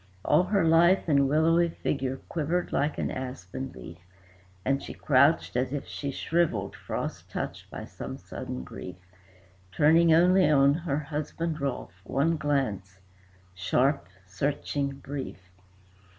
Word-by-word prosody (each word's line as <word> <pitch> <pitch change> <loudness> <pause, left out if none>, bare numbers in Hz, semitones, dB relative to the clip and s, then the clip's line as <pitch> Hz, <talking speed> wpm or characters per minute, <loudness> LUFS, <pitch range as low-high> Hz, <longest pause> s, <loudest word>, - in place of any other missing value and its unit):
All 155 +5 +4
her 190 -2 +2
lithe 170 +3 +5
and 140 -3 +3
willowy 165 +3 +3
figure 135 -4 -2
quivered 170 +2 -1
like 145 +1 0
an - - -1
aspen 130 -1 -6
leaf, 85 +1 -10 0.7
And 135 +1 +1
she - - -8
crouched 140 +1 +3
as 125 +1 0
if 145 -1 -3
she 140 - -5
shrivelled, 135 - 0
frost - - -5
touched - - -5
by - - -7
some - - -7
sudden 65 0 -6
grief, 90 +6 -8 0.8
Turning 160 - +5
only 180 +1 +5
on 140 -1 +5
her 155 -3 -2
husband, 155 +1 -3
Rolfe, 125 -9 -4
one 150 +9 +1
glance, 130 - -1 0.6
sharp, 95 - +1 0.2
searching, 140 +7 -2
brief. 140 0 -6
140 Hz, 130 wpm, -28 LUFS, 130-165 Hz, 0.8 s, lithe